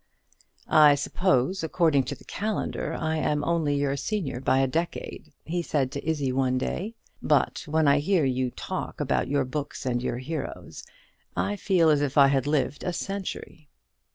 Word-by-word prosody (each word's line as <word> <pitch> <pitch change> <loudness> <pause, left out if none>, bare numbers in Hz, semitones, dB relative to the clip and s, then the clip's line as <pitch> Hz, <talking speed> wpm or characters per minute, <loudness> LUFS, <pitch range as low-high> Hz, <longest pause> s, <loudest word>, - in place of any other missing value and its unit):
"I 150 -2 +7
suppose, 165 +3 +1
according 160 -4 +2
to 140 - -4
the - - -18
calendar, 200 -6 -3
I 160 0 -1
am 150 -1 0
only 160 -4 +1
your 140 -1 0
senior 160 - -3
by 130 0 +2
a 135 - +4
decade," 165 +6 -4
he 175 +2 -1
said 140 -6 -1
to 140 - -5
Izzie 145 -5 0
one 130 0 +1
day; 195 - -3 0.3
"but - - +2
when 155 0 +2
I 140 +1 +5
hear 165 0 +2
you 130 -1 0
talk - - -5
about - - 0
your 140 -1 +1
books 140 +1 -5
and 120 -1 0
your 120 - -2
heroes, 155 +6 -6 0.5
I 205 - 0
feel 180 -5 +3
as 145 -1 +3
if 140 -1 -1
I 140 -1 +7
had 135 -1 +1
lived 145 -1 0
a 180 - -2
century." 190 -5 -5
145 Hz, 175 wpm, -26 LUFS, 135-165 Hz, 0.5 s, I